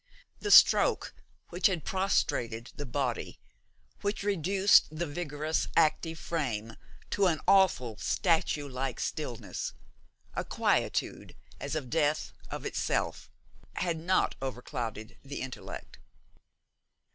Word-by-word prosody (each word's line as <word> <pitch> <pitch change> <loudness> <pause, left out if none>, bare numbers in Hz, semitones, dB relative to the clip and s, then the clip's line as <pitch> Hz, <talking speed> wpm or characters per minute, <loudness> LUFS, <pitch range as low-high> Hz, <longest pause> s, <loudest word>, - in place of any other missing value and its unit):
The 415 - -3
stroke - - +6 0.4
which 175 +1 +3
had 180 -6 -2
prostrated 120 - 0
the 145 -2 -6
body, 125 -1 -2 0.6
which 205 0 -2
reduced 195 0 +4
the 155 +3 -3
vigorous, 155 -1 -2
active 165 0 +2
frame 115 -11 -3 0.4
to 200 -2 +3
an 160 -4 +1
awful 130 - +4
statue 160 -4 +1
like 130 -1 -3
stillness - - -4 0.6
a - - -2
quietude - - -1 0.2
as - - -3
of 135 -6 -4
death 155 -1 +1 0.2
of - - -6
itself - - -1 0.5
had 170 -3 -1
not 185 +3 +2
overclouded 120 -4 -5
the 140 0 -6
intellect. 130 -1 -8
155 Hz, 110 wpm, -30 LUFS, 130-175 Hz, 0.6 s, stroke